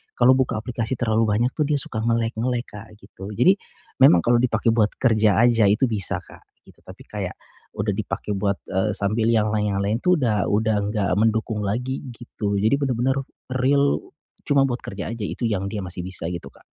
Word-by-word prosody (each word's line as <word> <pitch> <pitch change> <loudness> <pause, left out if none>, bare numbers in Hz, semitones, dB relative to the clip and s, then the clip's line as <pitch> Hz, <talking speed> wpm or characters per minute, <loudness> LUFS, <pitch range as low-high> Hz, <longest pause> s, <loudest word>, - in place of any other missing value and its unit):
kalau 130 +1 +5
buka 125 -4 0
aplikasi 115 +1 -3
terlalu 115 -2 +2
banyak 115 +5 +1
tuh 155 - +1
dia 145 -2 +1
suka 130 -7 -3
nge-lag-nge-lag 115 +1 0
Kak 105 +2 -10
gitu. 100 0 -10
Jadi 150 - +4 0.5
memang 90 -11 +7
kalau 120 0 +3
dipakai 115 -2 +1
buat 105 -2 +3
kerja 110 -4 +3
aja 115 -2 +4
itu 110 +6 +3
bisa 105 -5 0
Kak, - - -16 0.2
gitu. - - -19
Tapi - - -13
kayak - - -5 0.4
udah - - 0
dipakai 105 - -4
buat, 100 0 -1
eee, 95 +3 +1
sambil 110 +3 0
yang 110 -2 +2
lain 105 -1 0
yang - - 0
lain 105 +3 0
itu 180 0 +4
udah 110 -6 +1
udah 110 +1 +2
enggak 105 -1 -1
mendukung 110 -1 0
lagi 125 +7 -2
gitu. 105 -4 -4
Jadi 110 +7 +3
bener-bener 130 -1 0 0.4
real 140 +2 +2 0.4
cuma 140 -2 +3
buat 120 -1 -4
kerja 100 0 -6
aja. 115 -2 -5
Itu 115 +3 -2
yang 100 -3 -1
dia 105 - -3
masih 90 -1 -5
bisa 90 -3 -4
gitu, 85 -1 -5
Kak. - - -22
110 Hz, 195 wpm, -23 LUFS, 105-125 Hz, 0.5 s, memang